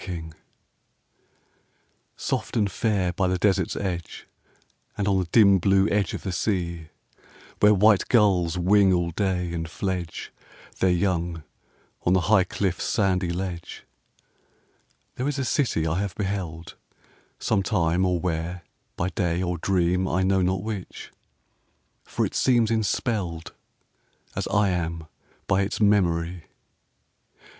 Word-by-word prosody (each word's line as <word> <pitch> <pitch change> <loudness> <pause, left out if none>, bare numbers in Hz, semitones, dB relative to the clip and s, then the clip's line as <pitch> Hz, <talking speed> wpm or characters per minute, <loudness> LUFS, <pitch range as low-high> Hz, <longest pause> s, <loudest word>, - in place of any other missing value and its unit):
THE - - -10
CITY 85 -3 -5 1.9
Soft - - -3
and 105 -3 +1
fair 100 -6 0
by 95 +1 0
the 90 0 0
Desert's 95 -1 +1
edge, 90 -4 -4 0.7
And 100 -1 -1
on 95 -1 +2
the 90 - -1
dim 100 -4 +6
blue 95 +2 +3
edge 100 -2 0
of - - -8
the 95 - -3
sea, 85 -4 -2 0.7
Where 105 0 +6
white 105 0 +4
gulls 95 -7 +3
wing 95 +2 +4
all 85 -1 0
day 90 -2 -1
and 80 -1 -4
fledge 90 -2 -4 0.5
Their 95 - +3
young 85 -2 0 0.6
on 90 - +2
the 95 - +3
high 95 +1 +3
cliff's 95 -1 -2
sandy 95 -5 +1
ledge, 90 -1 -5 1.3
There 125 - -1
is 145 -1 -2
a 135 - -1
city 120 - 0
I 80 +3 0
have 100 -3 -3
beheld, 90 -5 -4 0.6
Sometime 90 -3 +1
or 90 -2 +1
where, 85 0 -3 0.3
by 90 - -1
day 90 -1 -1
or 90 -2 -2
dream, 90 0 +1
I 95 0 0
know 95 0 +2
not 90 0 0
which, 105 -4 -6 0.9
for - - -1
it - - -5
seems 120 -4 +2
enspelled 100 -7 -1 0.8
As - - -2
I 105 -1 +2
am 85 -2 -2 0.4
by 95 - +2
its 100 +1 -2
memory. 90 -5 +1
95 Hz, 135 wpm, -25 LUFS, 85-100 Hz, 1.9 s, dim